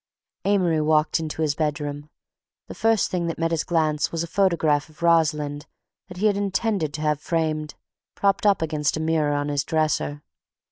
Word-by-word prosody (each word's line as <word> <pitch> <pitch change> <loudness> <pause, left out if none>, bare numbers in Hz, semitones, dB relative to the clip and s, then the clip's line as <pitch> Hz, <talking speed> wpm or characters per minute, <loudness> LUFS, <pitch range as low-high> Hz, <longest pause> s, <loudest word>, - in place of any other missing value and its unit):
Amory 180 -6 +2
walked 155 +1 +2
into 160 0 -3
his 150 -2 +1
bedroom. 145 -1 -3 0.6
The - - -9
first 225 -2 +1
thing 175 -2 -1
that 165 - -3
met 165 0 0
his 165 -2 0
glance 155 -3 0
was 165 0 -2
a - - -5
photograph 165 -5 +1
of 155 +2 -13
Rosalind 150 -3 +1 0.4
that 180 -2 -11
he 205 - -1
had 205 -2 +3
intended 200 -4 -1
to 150 - -5
have 150 -1 +1
framed, 155 -2 -2 0.4
propped 200 +1 +1
up 195 -5 +3
against 155 -2 -1
a - - -3
mirror 160 -2 +1
on 145 0 -1
his 145 -1 0
dresser. 155 -2 -1
160 Hz, 180 wpm, -24 LUFS, 150-170 Hz, 0.6 s, had